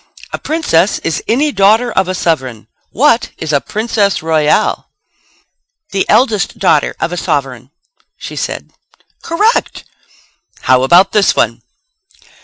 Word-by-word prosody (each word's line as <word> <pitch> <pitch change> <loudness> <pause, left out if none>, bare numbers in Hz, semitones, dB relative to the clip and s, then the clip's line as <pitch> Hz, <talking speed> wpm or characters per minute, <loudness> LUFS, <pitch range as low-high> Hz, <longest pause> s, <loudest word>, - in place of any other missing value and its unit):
"A - - -3
princess 210 - 0
is 165 -1 -2
any 290 +6 +1
daughter 220 +3 +3
of 190 -3 0
a 185 - -2
sovereign. 130 - -2 0.2
What 250 -1 +2
is 155 -2 -4
a 140 - +2
princess 210 -3 -1
royal?" 155 -2 +1 1.0
"The 195 -1 -1
eldest 220 -6 +1
daughter 155 -6 +1
of 170 - -2
a - - -4
sovereign," 135 -5 -3 0.5
she - - -8
said. - - -5 0.5
"Correct! 415 +8 0 0.8
How 130 0 +3
about 175 +9 +4
this 210 -2 +2
one? - - 0
190 Hz, 125 wpm, -14 LUFS, 155-225 Hz, 1.0 s, about